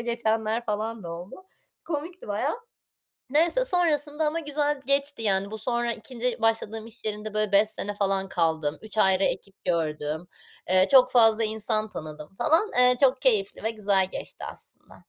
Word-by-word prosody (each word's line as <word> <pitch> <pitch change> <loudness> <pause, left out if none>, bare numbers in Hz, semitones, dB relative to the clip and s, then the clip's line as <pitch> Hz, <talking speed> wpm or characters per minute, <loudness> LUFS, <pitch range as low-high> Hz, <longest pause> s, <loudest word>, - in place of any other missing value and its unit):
geçenler 230 -1 -1
falan 215 0 -3
da 170 - -6
oldu. 180 - -9 0.4
Komikti 335 -1 -5
bayağı. 250 - -1 0.7
Neyse, 335 - +3
sonrasında 310 - +1
ama 315 +2 -1
güzel 295 -1 -1
geçti. 280 -3 +1
Yani, 200 -1 +1
bu 220 - -6
sonra 240 0 0
2. 245 +1 -4
başladığım 225 0 0
iş 230 +1 -8
yerinde, 215 0 -4
böyle, 215 -1 0
5 205 +2 +5
sene 205 -1 -4
falan 195 -1 0
kaldım. 160 -4 0
3 220 0 -7
ayrı 190 -1 +4
ekip 195 0 -4
gördüm. 160 -1 -2 0.4
Eee, 185 +1 +4
çok 255 -2 +7
fazla 225 -2 +5
insan 215 0 -1
tanıdım 155 +1 -9
falan. 325 - +2
Eee, 250 0 +5
çok 270 0 +3
keyifli 215 -7 +1
ve 225 - +1
güzel 200 -4 +1
geçti - - -6
aslında. - - -16
220 Hz, 160 wpm, -26 LUFS, 195-265 Hz, 0.7 s, çok